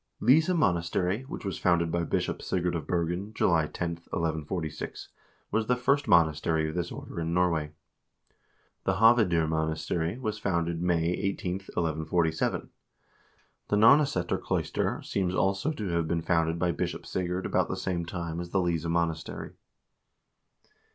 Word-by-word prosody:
1 - - -2
Lyse 155 +3 +5
monas 90 - +2
tery, 95 +9 -1
which - - -7
was 95 - -3
founded 85 -2 +2
by 85 0 0
Bishop - - -1
Sigurd 90 -1 -1
of 80 -4 -4
Bergen, 90 +5 -2
July 80 -4 +3
10, 85 +1 -3 0.2
1146, 80 -1 -3 0.4
was 110 0 0
the 125 - +3
first 140 +4 +1
monastery' 80 -1 +3
of 80 - -4
this 85 0 -2
order - - -7
in 85 +1 -1
Norway. 85 -4 +1 1.2
The 95 - +2
Hoved0 105 -7 +4
monastery 80 +3 -1
was 110 -4 -3
founded 85 -3 -1
May 85 -2 +1
18, 95 0 -2 0.2
1147. 80 0 0 1.0
The - - +1
Nonneseter 115 -2 +4
cloister - - -1
seems 95 -2 -1
also 95 +10 +1
to 105 -10 -4
have 85 -1 0
been 85 0 -1
founded 80 -1 +1
by 90 0 +1
Bishop 75 - -3
Sigurd 90 0 -2
about - - +1
the - - -2
same 90 -2 -2
time 85 -1 -4
as 85 0 -5
the 95 - +1
Lyse 85 -3 0
monastery. 85 -1 -2
85 Hz, 150 wpm, -28 LUFS, 80-95 Hz, 1.2 s, Lyse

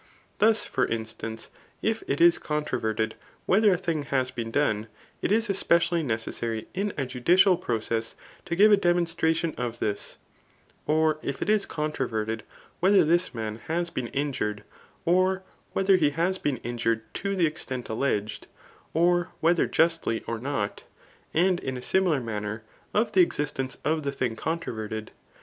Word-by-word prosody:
Thus 220 +1 +4
for 130 -2 0
instance, 110 0 -5 0.3
if 225 0 0
it 140 - 0
is 170 0 +6
controverted 115 -8 -1 0.3
whether 205 +2 +5
a 180 - +3
thing 165 -4 -1
has 130 -2 0
beesk 115 -3 -5
done, 110 -7 +1 0.3
it - - 0
is 225 +2 +3
especially 170 -3 +2
necessary 115 -3 -3
in 200 +3 -1
a 135 - 0
judicial 175 +10 +4
process 115 -4 -2 0.3
to 170 - -2
give 210 +4 +6
a 205 - +7
demonstration 170 -3 +1
of 120 -1 -3
this; 105 -3 -3 0.7
or 155 0 +2
if 140 - -3
it 210 - +1
is 215 -2 +2
controverted 115 -8 -2 0.4
whe 185 - +4
ther 200 -3 +6
this 170 -1 +2
man 110 -1 -3
has 170 +1 -1
been 125 -2 -3
injured, 115 -7 -2 0.4
or 185 +2 +3 0.3
whether 195 0 +4
he 155 -5 +3
has 170 +6 0
beea 135 -5 -1
injured 115 -1 0
to 200 0 -2
the 180 -3 +3
extent 130 -5 -4
alleged, 110 -3 -2 0.5
or 175 +1 +3
whether 170 +1 +3
justly 165 -8 +1
or 115 -1 -3
not. 120 -5 -2 0.5
And 180 +2 +3
in 130 -1 -4
a - - -6
similar 180 -4 +2
manner 110 -2 -4 0.3
of 215 +3 +1
the 190 - +5
existence 145 -5 -1
of 155 +1 +1
the 140 -1 -2
thing 125 -4 -2
controverted. 110 -8 -4
150 Hz, 155 wpm, -27 LUFS, 115-175 Hz, 0.7 s, a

